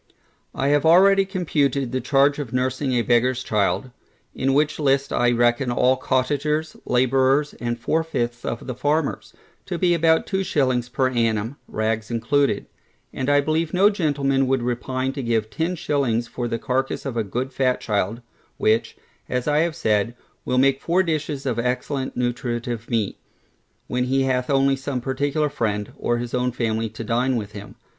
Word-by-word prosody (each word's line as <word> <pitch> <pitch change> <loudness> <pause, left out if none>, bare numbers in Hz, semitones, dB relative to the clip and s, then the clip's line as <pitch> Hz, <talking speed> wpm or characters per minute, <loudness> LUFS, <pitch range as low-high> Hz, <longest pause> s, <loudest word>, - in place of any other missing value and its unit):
I 135 - 0
have 145 0 +3
already 195 +4 +6
computed 145 -8 0
the 130 0 -1
charge 140 +3 +3
of 135 -6 -5
nursing 130 +2 -1
a 120 -1 +2
beggarŌĆÖs 125 +2 +2
child 105 +5 0 0.4
(in 135 +1 0
which 150 +2 +1
list 140 -1 +1
I 120 0 +3
reckon 120 +2 +2
all 125 +2 +3
cottagers, 145 +5 -1
labourers, 130 +3 +2
and 120 0 -2
four 160 +7 0
fifths 120 -7 -3
of - - -4
the 130 - -4
farmers) 145 +4 -1 0.3
to 180 - -3
be 175 0 +3
about 165 -1 +3
two 190 0 -1
shillings 130 -7 0
per 130 +1 0
annum, 115 +1 0
rags 110 0 -2
included; 130 +5 +1 0.5
and 130 +1 -2
I 145 0 +5
believe 155 +3 -1
no 200 +3 +5
gentleman 140 -7 +1
would 130 -2 +1
repine 130 +2 -2
to 140 - -4
give 115 -3 -1
ten 165 +11 -1
shillings 125 -7 0
for 120 0 -4
the 115 -1 -2
carcass 130 +3 -2
of 135 -3 -3
a 115 - 0
good 125 +6 -4
fat 125 -1 +1
child, 105 +2 -1 0.4
which, 110 +1 +1 0.3
as 125 +1 -2
I 150 0 +3
have 165 0 +1
said, 110 -4 0 0.3
will 125 - 0
make 135 +1 +3
four 180 +3 +2
dishes 150 -4 -2
of 120 -3 -1
excellent 130 +2 -2
nutritive 120 -1 -3
meat, 110 -4 -1 0.7
when 125 0 -1
he 135 +1 +1
hath 125 -1 0
only 135 0 +3
some 135 -1 -3
particular 140 +4 -1
friend, 105 -5 -2
or 120 - -1
his 120 0 -5
own 125 0 +1
family 115 -2 -1
to 110 +2 -7
dine 125 +4 +1
with 105 -3 -3
him. 100 -1 -10
130 Hz, 175 wpm, -23 LUFS, 120-145 Hz, 0.7 s, already